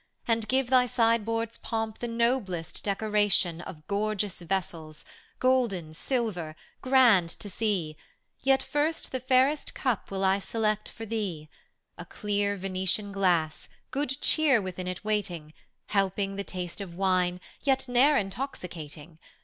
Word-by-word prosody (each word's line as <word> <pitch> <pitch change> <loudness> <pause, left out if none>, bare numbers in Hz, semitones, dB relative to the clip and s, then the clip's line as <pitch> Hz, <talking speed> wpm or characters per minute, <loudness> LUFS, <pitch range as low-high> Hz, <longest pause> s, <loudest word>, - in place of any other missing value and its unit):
And 225 -2 +1
give 260 +1 +1
thy 250 -1 +5
sideboard's 230 -1 +1
pomp 225 -1 -3
the 240 - -3
noblest 230 -8 -1
decoration 205 -4 +1
Of 155 -3 -10
gorgeous 205 -2 -1
vessels, 165 -4 -4 0.3
golden, 235 -11 +1
silver, 180 - -2 0.3
grand 245 -10 +5
to - - -7
see; 185 -9 -1 0.4
Yet 270 0 +3
first 300 +2 -1
the 260 - -2
fairest 260 +4 +2
cup 250 -6 -1
will 195 0 -2
I 190 +1 +3
select 215 0 -1
for 225 - -8
thee, 195 -9 -3 0.3
— - - -51
A - - -6
rlear 205 -1 -1
Venetian 190 +2 -2
glass, 175 -6 +1 0.2
good 280 0 -2
cheer 300 -6 +4
within 185 -2 -5
it 185 +2 -5
waiting, 180 -8 -2 0.4
Helping 195 0 0
the 200 - -3
taste 180 0 -5
of 180 -4 -7
wine, 180 -1 +1 0.2
yet 270 -1 +1
ne'er 265 +4 +5
intoxicating. 175 - -5
205 Hz, 135 wpm, -28 LUFS, 180-240 Hz, 0.4 s, thy